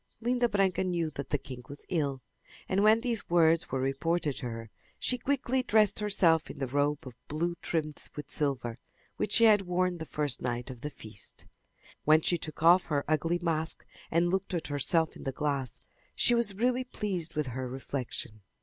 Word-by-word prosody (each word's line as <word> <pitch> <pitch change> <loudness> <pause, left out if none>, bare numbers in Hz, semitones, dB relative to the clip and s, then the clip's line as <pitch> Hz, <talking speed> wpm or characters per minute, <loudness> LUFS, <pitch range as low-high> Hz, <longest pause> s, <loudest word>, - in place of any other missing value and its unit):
Linda 245 +1 +1
Branca 195 -3 +2
knew 170 -4 -1
that 140 -2 -6
the 145 - +1
king 130 -3 -9
was 145 +1 -9
ill, 140 -7 -1 0.4
and 195 +1 +1
when 215 +2 +5
these 235 -3 -2
words 165 -1 +4
were 130 - -1
reported 145 +4 0
to 125 - -3
her 115 -1 -7 0.3
she 250 - 0
quickly 260 0 0
dressed 215 -4 +3
herself 175 -6 +3
in - - -8
the 135 - -1
robe 145 +3 0
of 130 - -8
blue 170 +4 -1
trimmed 155 -3 -2
with 150 - -7
silver, 130 -5 -2 0.4
which 210 - -1
she 230 - +5
had 215 -3 +7
worn 180 -1 0
the 160 - -6
first 145 -4 0
night 120 +1 -2
of 125 -2 -11
the 150 - -3
feast. 110 -8 -10 0.6
When 155 +1 +5
she 175 +2 +1
took 155 0 -7
off 175 +2 +7
her 145 -3 0
ugly 155 +3 +1
mask 160 -1 -2 0.2
and 170 +1 +2
looked 190 0 -1
at 165 - -3
herself 155 +3 +2
in - - -11
the 135 - -2
glass 140 -2 -2 0.4
she 240 - +4
was 235 -4 +3
really 250 +4 +1
pleased 190 -9 -3
with 150 -1 0
her 130 0 -3
reflection. 125 -4 -5
160 Hz, 190 wpm, -30 LUFS, 140-195 Hz, 0.6 s, had